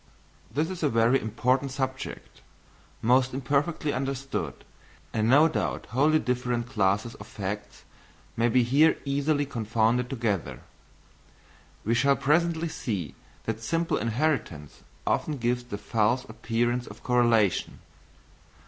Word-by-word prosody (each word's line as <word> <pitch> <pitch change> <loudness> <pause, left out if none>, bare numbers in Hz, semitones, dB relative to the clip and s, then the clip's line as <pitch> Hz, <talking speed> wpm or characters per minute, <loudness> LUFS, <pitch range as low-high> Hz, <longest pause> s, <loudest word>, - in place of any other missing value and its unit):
This 155 +8 -1
is 185 - -6
a 150 - +2
very 115 +3 +3
important 130 +5 0
subject, 130 -1 -5 0.6
most 125 +2 +3
imperfectly 145 +3 0
understood, 135 +1 -3 0.5
and 110 0 +1
no 145 +5 +7
doubt 160 - -2
wholly 150 +6 +4
different 125 -3 -1
classes 105 -1 0
of - - -11
facts 105 0 -6 0.5
may 115 +1 +2
be 125 +1 +4
here 140 +7 +4
easily 145 +1 +1
confounded 115 -1 0
together. 115 -8 -2 1.2
We 115 - +2
shall 140 +4 +4
presently 165 +4 +1
see 105 - -4 0.3
that 115 0 -3
simple 165 +8 0
inheritance 115 - -2 0.2
often 150 -2 0
gives 120 0 -1
the 120 -4 -5
false 115 +4 +1
appearance 120 +2 -1
of - - -12
correlation. 120 -6 +2
125 Hz, 120 wpm, -27 LUFS, 115-140 Hz, 1.2 s, no